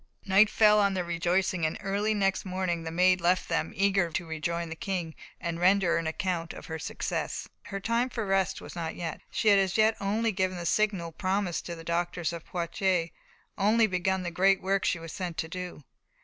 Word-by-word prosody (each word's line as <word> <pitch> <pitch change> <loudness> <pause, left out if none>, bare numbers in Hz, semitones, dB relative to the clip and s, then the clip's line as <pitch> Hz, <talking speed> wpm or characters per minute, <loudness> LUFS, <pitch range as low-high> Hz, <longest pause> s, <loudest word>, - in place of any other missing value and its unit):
Night 200 +2 +5
fell 210 -1 +5
on 200 -1 +2
their 180 - 0
rejoicings, 175 +1 0
and 155 0 0
early 205 +2 0
next 195 -2 +1
morning 185 -2 -2
the 165 - -5
Maid 180 +2 +3
left 180 +2 +2
them, - - -1
eager 195 -2 +2
to 170 +2 -3
rejoin 165 +1 -3
the 165 - -5
King, 175 -3 -3 0.3
and 170 0 -3
render 180 -1 +4
an 165 -1 -2
account 170 +1 -2
of - - -10
her 160 -1 -5
success. 145 - -3 0.2
Her 195 - -5
time 230 +5 0
for 225 -3 -3
rest 195 -1 +1
was - - -10
not 165 -2 -4
yet. 165 -2 -5
She 220 - +1
had 200 -1 +6
as 195 +1 +1
yet 220 0 +4
only 215 +3 0
given 185 -2 -1
the 175 - -5
sign 195 -3 +1
promised 190 -2 -1
to 170 - -4
the 165 - -10
doctors 170 0 -1
of 170 -1 -7
Poitiers 175 0 0 0.5
only 220 +3 +4
begun 190 -1 0
the 175 - -3
great 195 +3 +3
work 195 0 0
she - - +1
was 165 -1 -8
sent 175 -3 -4
to 160 - -2
do. 180 -2 -7
185 Hz, 205 wpm, -28 LUFS, 170-195 Hz, 0.5 s, had